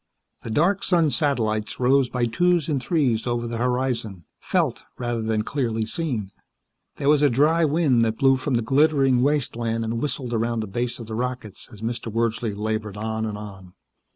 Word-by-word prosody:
The -, -, -7 dB
dark 175 Hz, -, +2 dB
sun 170 Hz, -5 st, +3 dB
satellites 115 Hz, -7 st, 0 dB
rose 130 Hz, +1 st, +3 dB
by 125 Hz, -2 st, 0 dB
twos 175 Hz, +7 st, +2 dB
and 145 Hz, -5 st, 0 dB
threes 125 Hz, -6 st, +1 dB
over 120 Hz, 0 st, -1 dB
the 115 Hz, 0 st, -4 dB
horizon, 125 Hz, -7 st, -1 dB
felt -, -, 0 dB, 0.2 s
rather 120 Hz, -2 st, -2 dB
than 110 Hz, -1 st, 0 dB
clearly 115 Hz, -4 st, -1 dB
seen. 115 Hz, -, -3 dB, 0.6 s
There 140 Hz, -, -3 dB
was 150 Hz, 0 st, +5 dB
a 145 Hz, -, +5 dB
dry 155 Hz, +7 st, +3 dB
wind 145 Hz, -6 st, +3 dB
that 110 Hz, 0 st, -1 dB
blew 135 Hz, -1 st, +4 dB
from 130 Hz, 0 st, -1 dB
the 115 Hz, -, +1 dB
glittering 135 Hz, 0 st, +3 dB
wasteland 120 Hz, -5 st, 0 dB
and 115 Hz, +1 st, -2 dB
whistled 130 Hz, -4 st, -3 dB
around 115 Hz, 0 st, 0 dB
the -, -, -3 dB
base 120 Hz, +4 st, -2 dB
of 115 Hz, -, -8 dB
the 110 Hz, -, -7 dB
rockets 120 Hz, -3 st, -4 dB
as 105 Hz, -2 st, -13 dB
Mr. 115 Hz, 0 st, -3 dB
Wordsley 115 Hz, -1 st, -1 dB
labored 110 Hz, -1 st, -3 dB
on 110 Hz, +1 st, -2 dB
and 105 Hz, -1 st, -4 dB
on. 95 Hz, -3 st, -10 dB
120 Hz, 180 wpm, -24 LUFS, 110-140 Hz, 0.6 s, was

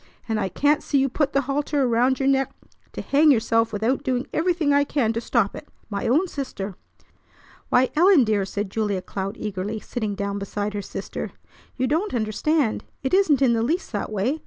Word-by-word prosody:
I 215 Hz, -4 st, -1 dB
can't 295 Hz, -, +2 dB
see 285 Hz, -, 0 dB
you 270 Hz, 0 st, +2 dB
put 285 Hz, +2 st, 0 dB
the 275 Hz, -, +2 dB
halter 285 Hz, +1 st, 0 dB
around 250 Hz, +1 st, +2 dB
your 270 Hz, -, +1 dB
neck 270 Hz, 0 st, +2 dB, 0.4 s
to -, -, -5 dB
hang 300 Hz, +2 st, +4 dB
yourself 230 Hz, -3 st, +3 dB
without 220 Hz, +5 st, 0 dB
doing 255 Hz, 0 st, -1 dB
everything 330 Hz, -3 st, +1 dB
I 285 Hz, 0 st, +4 dB
can 260 Hz, -6 st, 0 dB
to 230 Hz, -, -2 dB
stop 230 Hz, -4 st, +1 dB
it. -, -, -9 dB, 0.2 s
My 200 Hz, +2 st, -2 dB
own 305 Hz, +11 st, +3 dB
sister!" 255 Hz, -, -5 dB, 1.0 s
"Why, 250 Hz, +1 st, +3 dB
Ellen, 350 Hz, -2 st, +6 dB
dear!" 210 Hz, -3 st, +1 dB
said 200 Hz, +1 st, -4 dB
Julia 205 Hz, -4 st, -1 dB
Cloud 195 Hz, +3 st, -5 dB
eagerly, 210 Hz, +1 st, -4 dB
sitting 215 Hz, -2 st, -4 dB
down 200 Hz, 0 st, -3 dB
beside 205 Hz, +1 st, -3 dB
her 205 Hz, -, -3 dB
sister. -, -, -6 dB, 0.4 s
"You 255 Hz, -, +1 dB
don't 315 Hz, +5 st, 0 dB
understand. 230 Hz, +4 st, 0 dB, 0.2 s
It 265 Hz, -, -2 dB
isn't 320 Hz, -8 st, +4 dB
in 245 Hz, -3 st, +4 dB
the 225 Hz, -, +1 dB
least 330 Hz, +11 st, -1 dB
that 210 Hz, -1 st, -3 dB
way. 225 Hz, +10 st, -1 dB
245 Hz, 190 wpm, -24 LUFS, 210-285 Hz, 1.0 s, Ellen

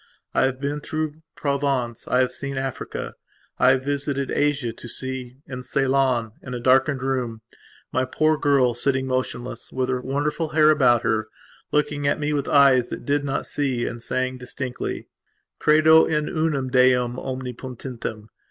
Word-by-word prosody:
I -, -, +3 dB
have 130 Hz, -1 st, -1 dB
been 145 Hz, +2 st, -2 dB
through 155 Hz, +1 st, -4 dB
Provence; 140 Hz, -5 st, -1 dB
I 125 Hz, -, +3 dB
have 125 Hz, -1 st, +1 dB
seen 140 Hz, +1 st, -5 dB
Africa; 135 Hz, -1 st, -4 dB, 0.5 s
I 125 Hz, -, +6 dB
have 130 Hz, 0 st, +3 dB
visited 140 Hz, -1 st, -1 dB
Asia 145 Hz, -5 st, 0 dB
to -, -, -10 dB
see, 130 Hz, +1 st, -5 dB
in 125 Hz, -1 st, -6 dB
Ceylon, 130 Hz, -3 st, +1 dB
in 125 Hz, -1 st, -6 dB
a -, -, -3 dB
darkened 130 Hz, +2 st, +3 dB
room, 125 Hz, -4 st, -2 dB, 0.5 s
my 130 Hz, 0 st, +1 dB
poor 155 Hz, +4 st, +2 dB
girl, 140 Hz, -4 st, +3 dB
sitting 130 Hz, +2 st, +1 dB
motionless, 130 Hz, -1 st, -3 dB
with 130 Hz, 0 st, -1 dB
her 125 Hz, -1 st, 0 dB
wonderful 145 Hz, +5 st, -1 dB
hair 155 Hz, 0 st, +7 dB
about 125 Hz, -6 st, +4 dB
her, 110 Hz, 0 st, 0 dB, 0.4 s
looking 145 Hz, -1 st, 0 dB
at 140 Hz, -, +1 dB
me 150 Hz, 0 st, -1 dB
with 145 Hz, -1 st, -1 dB
eyes 135 Hz, -4 st, +5 dB
that -, -, -6 dB
did 145 Hz, 0 st, +1 dB
not 135 Hz, -1 st, -2 dB
see 130 Hz, -5 st, -1 dB
me, -, -, 0 dB
and 115 Hz, 0 st, -5 dB
saying 130 Hz, +1 st, -2 dB
distinctly: 125 Hz, 0 st, -5 dB, 0.5 s
"Credo 155 Hz, +1 st, +6 dB
in 150 Hz, -1 st, 0 dB
unum 150 Hz, -5 st, -1 dB
Deum 125 Hz, -1 st, +3 dB
omnipotentem.... 125 Hz, -3 st, -6 dB
130 Hz, 160 wpm, -23 LUFS, 125-145 Hz, 0.5 s, hair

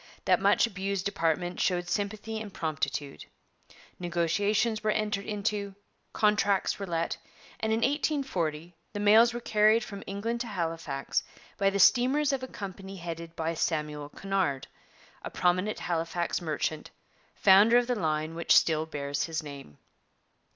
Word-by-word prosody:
That -, -, +3 dB
much -, -, +4 dB
abused 195 Hz, -3 st, -3 dB
department 175 Hz, -1 st, -1 dB
showed 175 Hz, -1 st, 0 dB
sympathy 215 Hz, +4 st, -3 dB
and 210 Hz, -2 st, -7 dB
promptitude. 145 Hz, -4 st, -3 dB, 0.7 s
Negotiations 200 Hz, +6 st, 0 dB
were 215 Hz, -, +1 dB
entered 210 Hz, -2 st, -1 dB
into, 205 Hz, -1 st, -2 dB, 0.4 s
contracts 205 Hz, -2 st, +2 dB
were 200 Hz, -, -4 dB
let, 165 Hz, -1 st, -1 dB, 0.4 s
and 220 Hz, -, -1 dB
in 225 Hz, +1 st, +1 dB
1840 225 Hz, -, -1 dB, 0.2 s
the 205 Hz, -, -4 dB
mails 220 Hz, +3 st, +6 dB
were 240 Hz, -, -4 dB
carried 215 Hz, 0 st, +3 dB
from 200 Hz, -2 st, -8 dB
England 225 Hz, +4 st, -3 dB
to 240 Hz, -, -4 dB
Halifax 165 Hz, -8 st, -2 dB, 0.4 s
by 195 Hz, -1 st, +4 dB
the 195 Hz, -, -2 dB
steamers 270 Hz, +8 st, +4 dB
of 270 Hz, -, -1 dB
a 260 Hz, -, -5 dB
company 195 Hz, -3 st, -8 dB
headed 170 Hz, -2 st, -7 dB
by 165 Hz, 0 st, -2 dB
Samuel 150 Hz, -3 st, -2 dB
Cunard, 185 Hz, -8 st, -1 dB, 0.6 s
a -, -, -6 dB
prominent 185 Hz, +4 st, +1 dB
Halifax 170 Hz, +1 st, -2 dB
merchant, 155 Hz, -1 st, -3 dB, 0.5 s
founder 205 Hz, +4 st, +6 dB
of 245 Hz, -, +3 dB
the 250 Hz, -, 0 dB
line 155 Hz, -6 st, -1 dB
which 170 Hz, 0 st, +3 dB
still 160 Hz, -1 st, +2 dB
bears 140 Hz, -2 st, -2 dB
his 160 Hz, -1 st, -3 dB
name. 140 Hz, -, -10 dB
190 Hz, 145 wpm, -29 LUFS, 165-215 Hz, 0.7 s, mails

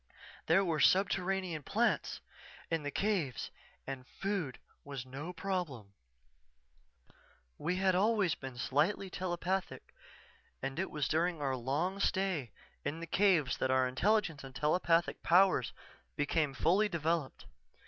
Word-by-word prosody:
There 190 Hz, +5 st, +4 dB
were 165 Hz, -3 st, 0 dB
subterranean 185 Hz, -1 st, +2 dB
plants 225 Hz, -, 0 dB, 0.5 s
in 165 Hz, -1 st, +1 dB
the 145 Hz, -, -3 dB
caves 180 Hz, -, -1 dB, 0.3 s
and 135 Hz, -1 st, -6 dB
food 195 Hz, -9 st, -2 dB, 0.3 s
was 140 Hz, -3 st, -6 dB
no 140 Hz, +7 st, -6 dB
problem._" 175 Hz, -, -4 dB, 1.7 s
"_We 180 Hz, +4 st, 0 dB
had 190 Hz, 0 st, +3 dB
always 200 Hz, -1 st, +3 dB
been 130 Hz, -2 st, -8 dB
slightly 160 Hz, +10 st, 0 dB
telepathic 180 Hz, +1 st, -3 dB, 0.7 s
and 135 Hz, +4 st, -4 dB
it 190 Hz, -, -1 dB
was 150 Hz, -3 st, -1 dB
during 165 Hz, +1 st, +1 dB
our 135 Hz, -2 st, 0 dB
long 145 Hz, +10 st, -1 dB
stay 190 Hz, -, 0 dB, 0.3 s
in 160 Hz, -, -3 dB
the 170 Hz, -, -5 dB
caves 170 Hz, -8 st, +3 dB
that 130 Hz, -, 0 dB
our 130 Hz, 0 st, +3 dB
intelligence 165 Hz, +2 st, +1 dB
and 135 Hz, -1 st, -10 dB
telepathic 165 Hz, +2 st, +2 dB
powers 180 Hz, -7 st, +4 dB, 0.5 s
became 145 Hz, -1 st, +1 dB
fully 195 Hz, +9 st, +3 dB
developed. 165 Hz, -4 st, -1 dB
165 Hz, 125 wpm, -33 LUFS, 140-190 Hz, 1.7 s, There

